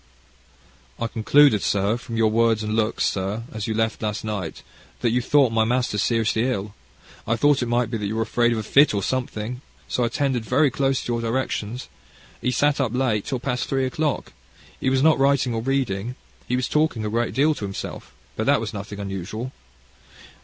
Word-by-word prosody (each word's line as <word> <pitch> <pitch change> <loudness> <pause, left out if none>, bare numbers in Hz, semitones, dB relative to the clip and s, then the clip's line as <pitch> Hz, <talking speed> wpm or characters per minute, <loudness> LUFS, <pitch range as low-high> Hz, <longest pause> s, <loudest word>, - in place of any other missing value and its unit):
"I 115 - -1
concluded, 115 +1 +4
sir, 100 +2 +1
from 120 -1 -6
your 110 -1 +3
words, 115 -1 +2
and 105 0 -2
looks, 110 0 +1
sir, 100 +4 -1
as 110 -2 -4
you 110 - -1
left 110 0 0
last 105 -1 -2
night, 100 -6 -4 0.4
that 120 - +2
you 125 +2 +2
thought 135 -1 +3
my 115 0 +3
master 125 +1 0
was 105 - 0
seriously 115 0 +1
ill. 100 -4 -3 0.5
I 115 - +2
thought 145 +3 +3
it 120 - -1
might 120 -1 +1
be 115 - -2
that 105 - -2
you 110 - -3
were 115 - +1
afraid 120 +1 +2
of 115 - 0
a 110 - -2
fit, 140 +2 +4
or 100 - -1
something. 125 -1 -3 0.3
So - - -1
I 120 - +3
attended 130 -2 -1
very 130 +5 +3
close 135 0 0
to 120 - -2
your 115 - -1
directions. 115 -1 -2 0.5
He - - 0
sat 145 +3 +2
up 125 -3 -1
late, 120 -6 +1
till 130 -4 -2
past 125 0 -2
three 135 -1 +1
o'clock. 145 +3 -2 0.5
He 130 - +1
was 130 0 +2
not 160 -2 +5
writing 135 -2 +3
or 115 - -1
reading. 125 -3 -1 0.3
He 125 - 0
was 125 -1 0
talking 150 -8 +1
a - - -1
great 115 +1 -1
deal 150 +3 +4
to 105 - -5
himself, 95 -1 -6 0.2
but - - -2
that - - +4
was - - -4
nothing 100 0 -6
unusual. 100 +5 -5
115 Hz, 210 wpm, -23 LUFS, 110-130 Hz, 0.5 s, not